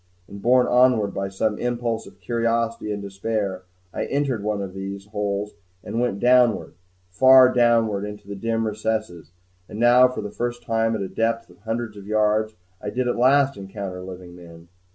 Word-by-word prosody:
And, 100 Hz, 0 st, -10 dB
borne 125 Hz, +3 st, +4 dB
onward 120 Hz, -5 st, +3 dB
by 95 Hz, 0 st, -3 dB
some 105 Hz, +2 st, -1 dB
impulse 120 Hz, -2 st, -2 dB
of 100 Hz, 0 st, -16 dB
curiosity 115 Hz, +1 st, -1 dB
and 100 Hz, -1 st, -4 dB
despair, 100 Hz, -1 st, -3 dB, 0.3 s
I -, -, -2 dB
entered 140 Hz, -5 st, -1 dB
one 105 Hz, -1 st, -1 dB
of 95 Hz, -2 st, -5 dB
these 95 Hz, +1 st, -6 dB
holes, 105 Hz, -1 st, -3 dB, 0.3 s
and 115 Hz, -, -3 dB
went 110 Hz, -5 st, -1 dB
downward, 125 Hz, -2 st, +3 dB, 0.4 s
far 130 Hz, +5 st, +7 dB
downward 115 Hz, -4 st, +2 dB
into 105 Hz, -1 st, -8 dB
the 100 Hz, -, -6 dB
dim 115 Hz, +2 st, -1 dB
recesses. 110 Hz, -5 st, -3 dB, 0.4 s
And 105 Hz, -, -7 dB
now 120 Hz, +2 st, +6 dB
for 125 Hz, -3 st, -5 dB
the 105 Hz, -, -6 dB
first 120 Hz, +2 st, -4 dB
time, 115 Hz, -1 st, 0 dB
at 105 Hz, -, -3 dB
a -, -, -3 dB
depth 115 Hz, -1 st, -2 dB
of 90 Hz, -, -21 dB
hundreds 115 Hz, 0 st, -4 dB
of 100 Hz, -1 st, -11 dB
yards, 110 Hz, 0 st, +1 dB, 0.3 s
I -, -, -4 dB
did 125 Hz, +3 st, -2 dB
at 120 Hz, -, 0 dB
last 135 Hz, +3 st, +3 dB
encounter 95 Hz, -1 st, -7 dB
living 90 Hz, -1 st, -10 dB
men. 85 Hz, -1 st, -14 dB
110 Hz, 180 wpm, -23 LUFS, 100-120 Hz, 0.4 s, far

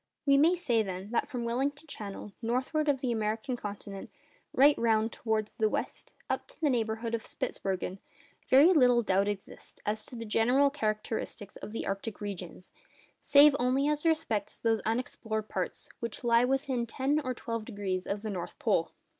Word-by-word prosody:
We 280 Hz, -1 st, +5 dB
may 320 Hz, +6 st, +5 dB
say, 245 Hz, -10 st, +1 dB
then, 190 Hz, 0 st, -5 dB
that 240 Hz, -, +1 dB
from 245 Hz, -2 st, -4 dB
Wellington 275 Hz, +6 st, -1 dB
Channel, 205 Hz, -7 st, -7 dB
northward 260 Hz, +6 st, 0 dB
of 270 Hz, -2 st, +1 dB
the 255 Hz, -, 0 dB
American 220 Hz, +3 st, -1 dB
continent, 200 Hz, -3 st, -7 dB, 0.4 s
right 285 Hz, +2 st, +6 dB
round 225 Hz, -1 st, +2 dB
towards 220 Hz, -2 st, -2 dB
the 220 Hz, -1 st, +1 dB
west, -, -, -4 dB
up -, -, -2 dB
to -, -, -15 dB
the 300 Hz, -4 st, +2 dB
neighbourhood 225 Hz, -1 st, -1 dB
of 230 Hz, -, -1 dB
Spitzbergen, 190 Hz, 0 st, -3 dB, 0.5 s
very 290 Hz, +8 st, +7 dB
little 250 Hz, -6 st, +5 dB
doubt 195 Hz, 0 st, +2 dB
exists 205 Hz, -2 st, -6 dB
as 215 Hz, +1 st, 0 dB
to -, -, -8 dB
the 230 Hz, -1 st, -5 dB
general 250 Hz, +6 st, +3 dB
characteristics 215 Hz, -5 st, -3 dB
of -, -, -8 dB
the 225 Hz, -, -4 dB
arctic 200 Hz, +2 st, -4 dB
regions, 185 Hz, -3 st, -6 dB, 0.5 s
save 285 Hz, 0 st, +7 dB
only 255 Hz, +3 st, +2 dB
as 300 Hz, 0 st, 0 dB
respects 315 Hz, -11 st, 0 dB
those 225 Hz, -1 st, +1 dB
unexplored 220 Hz, -2 st, -2 dB
parts -, -, -3 dB
which 235 Hz, +1 st, -5 dB
lie 235 Hz, 0 st, +4 dB
within 260 Hz, -2 st, 0 dB
ten 270 Hz, +5 st, 0 dB
or 255 Hz, -1 st, -2 dB
twelve 230 Hz, -2 st, -4 dB
degrees 195 Hz, -3 st, -3 dB
of 200 Hz, +1 st, -3 dB
the 215 Hz, -, -3 dB
North 180 Hz, -3 st, -5 dB
Pole. -, -, +1 dB
230 Hz, 170 wpm, -30 LUFS, 210-265 Hz, 0.5 s, very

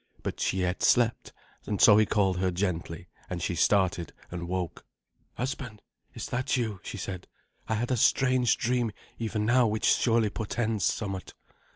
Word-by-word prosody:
But -, -, -4 dB
she 95 Hz, -, 0 dB
yet 90 Hz, 0 st, -1 dB
slept, 120 Hz, -1 st, +2 dB, 0.4 s
and 105 Hz, -, -2 dB
so 105 Hz, -, +8 dB
he 110 Hz, -1 st, +4 dB
called 95 Hz, -3 st, +2 dB
her 95 Hz, 0 st, +1 dB
gently, 85 Hz, -2 st, -3 dB, 0.2 s
and 90 Hz, -, -3 dB
she 85 Hz, -, -2 dB
started 90 Hz, 0 st, +1 dB, 0.2 s
and 85 Hz, -1 st, -5 dB
woke. 90 Hz, -1 st, -3 dB, 0.5 s
"Husband, 125 Hz, -4 st, -4 dB, 0.4 s
is -, -, -5 dB
that 130 Hz, +1 st, 0 dB
you?" 110 Hz, -6 st, -2 dB
she 105 Hz, -, -7 dB
said. 95 Hz, -2 st, -6 dB, 0.4 s
"I 110 Hz, -, +1 dB
had 120 Hz, +4 st, -2 dB
a 125 Hz, -, +2 dB
strange 130 Hz, 0 st, +3 dB
dream 120 Hz, -2 st, 0 dB, 0.3 s
even 110 Hz, -2 st, -2 dB
now 120 Hz, +1 st, +4 dB
which 110 Hz, +1 st, -1 dB
surely 115 Hz, -3 st, +3 dB
portends 110 Hz, -2 st, -1 dB
somewhat." 95 Hz, -4 st, -3 dB
105 Hz, 165 wpm, -28 LUFS, 95-120 Hz, 0.5 s, so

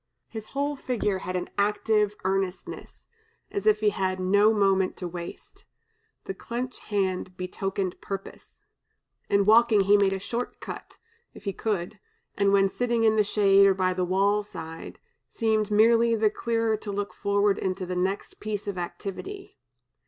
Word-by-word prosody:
His 220 Hz, -2 st, -8 dB
whole 285 Hz, +1 st, 0 dB
figure 220 Hz, -8 st, -1 dB
had 185 Hz, 0 st, -5 dB
an 180 Hz, -, -3 dB
active 210 Hz, 0 st, +2 dB
earnestness, 190 Hz, -1 st, -3 dB, 0.5 s
as 200 Hz, +1 st, -3 dB
if 215 Hz, 0 st, +4 dB
he 210 Hz, -, +4 dB
had 185 Hz, -1 st, -1 dB
no 205 Hz, +4 st, +4 dB
moment 195 Hz, -3 st, +2 dB
to 180 Hz, -, -4 dB
waste; 170 Hz, 0 st, -9 dB, 0.6 s
the -, -, -5 dB
clenched 245 Hz, +6 st, -5 dB
hand 185 Hz, -3 st, -2 dB
betokened 190 Hz, 0 st, -3 dB
purpose. 195 Hz, -1 st, -8 dB, 0.6 s
In 200 Hz, 0 st, +3 dB
walking 220 Hz, 0 st, +6 dB
he 200 Hz, +2 st, +5 dB
made 195 Hz, -1 st, +3 dB
a 195 Hz, -, -1 dB
short 235 Hz, +5 st, -4 dB
cut, -, -, -8 dB, 0.4 s
if -, -, -12 dB
he 200 Hz, -, -2 dB
could, 205 Hz, -1 st, -3 dB, 0.4 s
and 200 Hz, -1 st, +2 dB
when 195 Hz, -1 st, +5 dB
sitting 235 Hz, +2 st, 0 dB
in 220 Hz, -1 st, +4 dB
the 215 Hz, -, +4 dB
shade 200 Hz, -1 st, +5 dB
or 195 Hz, -, +3 dB
by 185 Hz, -1 st, +1 dB
the 180 Hz, 0 st, -1 dB
wall 195 Hz, +3 st, +2 dB
side, 165 Hz, -5 st, -9 dB, 0.3 s
seemed 220 Hz, -2 st, 0 dB
merely 230 Hz, +2 st, +4 dB
the 215 Hz, -1 st, +2 dB
clearer 225 Hz, -1 st, 0 dB
to 210 Hz, -1 st, -6 dB
look 200 Hz, 0 st, -3 dB
forward 200 Hz, 0 st, +1 dB
into 185 Hz, 0 st, -2 dB
the 180 Hz, 0 st, -4 dB
next 190 Hz, +3 st, -2 dB
piece 210 Hz, -1 st, -4 dB
of 195 Hz, -3 st, -3 dB
activity. 200 Hz, -, -7 dB
200 Hz, 160 wpm, -26 LUFS, 190-215 Hz, 0.6 s, walking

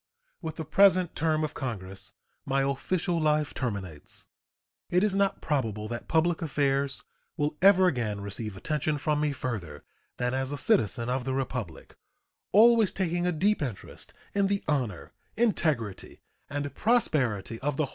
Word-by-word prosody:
With 160 Hz, -3 st, -5 dB
the 160 Hz, -, -5 dB
present 185 Hz, +1 st, +4 dB
term 155 Hz, -1 st, +1 dB
of 155 Hz, -, -2 dB
Congress 95 Hz, -7 st, -6 dB, 0.3 s
my 135 Hz, 0 st, +1 dB
official 170 Hz, +6 st, 0 dB
life 150 Hz, -1 st, +1 dB
terminates. 100 Hz, -, -5 dB, 0.6 s
It 180 Hz, +2 st, +3 dB
is 210 Hz, -2 st, +2 dB
not 200 Hz, 0 st, +1 dB
probable 110 Hz, -8 st, -1 dB
that 120 Hz, 0 st, -5 dB
public 165 Hz, +1 st, +2 dB
affairs 140 Hz, -3 st, 0 dB, 0.3 s
will 150 Hz, -1 st, 0 dB
ever 190 Hz, -1 st, +7 dB
again 120 Hz, -, 0 dB
receive 100 Hz, 0 st, -5 dB
attention 150 Hz, +5 st, -1 dB
from 150 Hz, +1 st, 0 dB
me 150 Hz, -1 st, +1 dB
further 105 Hz, -, -5 dB, 0.3 s
than 125 Hz, 0 st, -1 dB
as 130 Hz, +1 st, -1 dB
a 145 Hz, -, -3 dB
citizen 115 Hz, -2 st, +1 dB
of 125 Hz, +1 st, -1 dB
the 130 Hz, +1 st, -2 dB
Republic, 125 Hz, -10 st, -4 dB, 0.6 s
always 225 Hz, -1 st, +6 dB
taking 175 Hz, -1 st, -1 dB
a -, -, +2 dB
deep 195 Hz, +5 st, +1 dB
interest 125 Hz, -9 st, -6 dB, 0.2 s
in 200 Hz, -1 st, +2 dB
the 200 Hz, 0 st, -1 dB
honor, 125 Hz, -, -2 dB, 0.2 s
integrity, 155 Hz, -, -1 dB, 0.3 s
and 145 Hz, -1 st, -3 dB
prosperity 130 Hz, -, +1 dB
of 145 Hz, 0 st, -2 dB
the 155 Hz, -, +2 dB
whole -, -, +1 dB
land. -, -, -11 dB
145 Hz, 155 wpm, -28 LUFS, 120-175 Hz, 0.6 s, ever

